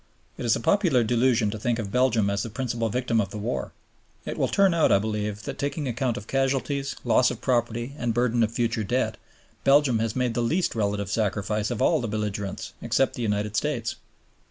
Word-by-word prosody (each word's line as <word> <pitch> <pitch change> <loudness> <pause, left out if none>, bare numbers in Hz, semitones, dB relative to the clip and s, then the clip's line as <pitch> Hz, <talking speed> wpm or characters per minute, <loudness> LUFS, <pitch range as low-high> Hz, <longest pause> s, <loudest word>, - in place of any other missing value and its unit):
It - - -5
is 115 - +4
a - - -2
popular 165 - +3
delusion 115 -1 +2
to 110 - -5
think 120 +2 0
of 105 -4 -4
Belgium 120 -4 +2
as 100 0 -1
the 115 - -4
principal 115 0 -2
victim 120 0 +1
of 100 - -3
the 105 - -7
war; 110 +4 -3 0.5
it - - -4
will - - +1
turn 195 -3 +3
out, 165 -2 +3
I - - +6
believe, 105 0 -3
that - - -6
taking 140 +1 -2
account 125 0 -1
of 105 - -7
casualties, 135 +2 -1
loss 125 +1 +4
of 120 - -5
property 120 0 -1
and 120 -1 0
burden 120 0 +1
of 110 -1 +2
future 115 -1 -1
debt, 125 +6 -1 0.5
Belgium 135 -4 +4
has 115 0 -1
made 125 -2 0
the 120 - 0
least 165 +10 +1
relative 100 -3 -1
sacrifice 105 0 -1
of 120 -4 -1
all 160 -4 +3
the 115 - -2
belligerents 105 -2 -4
except 135 - +1
the - - -6
United 105 -1 -1
States. 115 -5 -1
115 Hz, 205 wpm, -25 LUFS, 105-130 Hz, 0.5 s, I